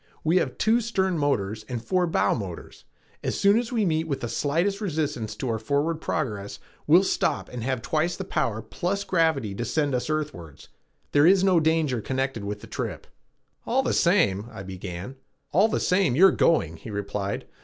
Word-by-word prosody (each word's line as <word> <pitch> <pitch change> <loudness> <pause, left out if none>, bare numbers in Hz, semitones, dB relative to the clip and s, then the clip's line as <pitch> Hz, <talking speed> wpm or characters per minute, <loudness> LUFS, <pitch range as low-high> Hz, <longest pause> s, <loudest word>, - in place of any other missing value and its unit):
We 165 +3 +3
have 145 -8 0
two 225 +2 +3
stern 190 -5 0
motors 110 -7 -1
and 125 -2 -3
four 180 +8 0
bow 165 - +2
motors. 95 -7 -7 0.4
As - - -2
soon 200 +3 +5
as 240 0 -4
we 225 -4 +1
meet 160 -2 0
with 140 -3 -3
the 120 - -2
slightest 170 - 0
resistance 145 - -2
to 130 - -4
our 115 -2 -1
forward 145 +7 -1
progress 105 -10 -3 0.3
we 155 +3 +7
will 190 - +4
stop - - 0
and 125 -2 -6
have 130 -2 -2
twice 155 +5 0
the 190 - -4
power 110 - -1
plus 185 - -2
gravity 160 - +1
to 120 - -4
send 145 +2 0
us 125 +4 -1
earthwards. 145 - -4 0.4
There 145 +2 +5
is 190 +1 +5
no 185 -3 +4
danger 155 -6 +1
connected 130 -2 -2
with 105 +1 -5
the - - -9
trip." - - -5 0.6
"All - - +1
the - - 0
same 100 +3 +2
" - - -16
I 95 - -8
began. 95 +5 -7 0.3
"All 195 +7 +4
the 220 - -1
same, 180 -8 +2
you're 190 +5 +7
going," 85 - +2
he 95 - -10
replied. 100 -1 -3
145 Hz, 195 wpm, -25 LUFS, 110-175 Hz, 0.6 s, we